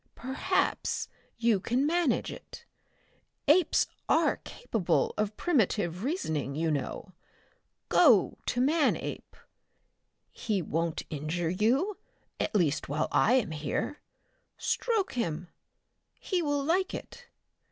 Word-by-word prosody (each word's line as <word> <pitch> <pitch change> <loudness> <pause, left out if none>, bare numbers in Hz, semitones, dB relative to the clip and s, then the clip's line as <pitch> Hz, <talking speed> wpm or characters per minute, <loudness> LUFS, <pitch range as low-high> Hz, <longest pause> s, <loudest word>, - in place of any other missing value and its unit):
Perhaps 260 +2 -1 0.3
you 230 -3 +3
can 245 +8 0
manage 335 -2 +1
it. - - -11 0.8
Apes 320 +3 +4 0.2
are - - +3
capable 210 -7 -1
of 210 0 -2
primitive 210 - +1
reasoning, 160 - -2
you 160 +1 0
know. 150 +6 -4 0.7
Go 245 - +5
to 245 - 0
Manape. 300 +4 0 1.0
He 210 -4 -1
won't 165 0 -2
injure 160 +3 -2
you, 255 - +1 0.4
at - - -2
least 160 -9 +1
while 150 +2 -1
I 240 - +4
am 250 -10 +2
here. 155 - -3 0.6
Stroke 445 -6 0
him. 175 -8 -2 0.7
He 370 -3 -1
will 290 -3 0
like 365 +6 +1
it. - - -9
220 Hz, 110 wpm, -29 LUFS, -, 1.0 s, Go